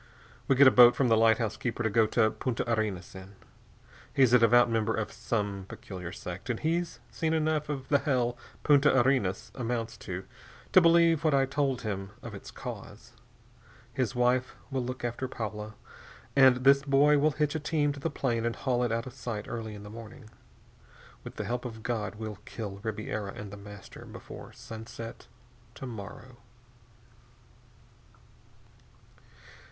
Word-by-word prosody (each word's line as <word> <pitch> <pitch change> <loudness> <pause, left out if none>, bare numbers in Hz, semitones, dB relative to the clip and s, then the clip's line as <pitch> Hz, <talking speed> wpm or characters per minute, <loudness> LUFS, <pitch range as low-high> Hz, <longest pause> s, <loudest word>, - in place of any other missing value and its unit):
"We 135 - +4
get 140 +2 +7
a 130 - +9
boat 120 -1 +8
from 130 -3 +2
the 115 - +5
lighthouse 110 -1 +3
keeper 120 +2 -3
to 110 - +2
go 110 +1 +4
to 110 0 +3
Punta 125 -3 -2
Arenas 110 -6 -1
in. 95 +1 -11 0.8
He's 130 -3 +4
a 125 - +8
devout 120 +1 +6
member 110 -1 0
of 110 - -3
some 100 -4 -3
peculiar 90 -3 -7
sect, 90 +4 -7
and 120 - -1
he's 165 -4 -1
seen 160 -1 -1
enough 155 -1 0
of 135 -3 -4
the 145 - +4
hell 125 -5 0 0.3
Punta 145 -2 +5
Arenas 120 -7 +1
amounts 115 -2 -3
to, 95 -2 -6 0.5
to 185 - +8
believe 165 -2 +5
what 155 -3 +3
I 135 -1 +4
told 135 -2 -1
him 100 -3 -3
of 115 - -7
its 100 - -9
cause. - - -9 0.8
His 125 -5 -1
wife 125 +1 +1 0.2
will 130 -2 -1
look 125 0 -4
after 120 +2 -3
Paula, 110 -3 -5 0.6
and 130 -2 +6
this 140 +1 +6
boy 145 +1 +4
will 150 +1 +3
hitch 150 -1 +1
a 160 - -1
team 145 -1 0
to 140 - -9
the - - -1
plane 120 -5 -1
and 115 0 -1
haul 125 -2 0
it 120 -2 0
out 115 +2 -1
of 130 - -8
sight 115 -5 -5
early 110 -2 -5
in 100 - -10
the 105 - -9
morning. 115 +1 -11 0.9
With - - -9
the - - -4
help 125 +1 -2
of 110 -3 -7
God, 105 -4 -2
we'll 110 -2 -6
kill 100 -4 -6
Ribiera 110 -2 -4
and 100 -1 -8
The 100 - -8
Master 100 -1 -11
before - - -10
sunset 115 +1 -9 0.5
to - - -7
morrow." 120 +2 -9
120 Hz, 170 wpm, -29 LUFS, 110-135 Hz, 0.9 s, a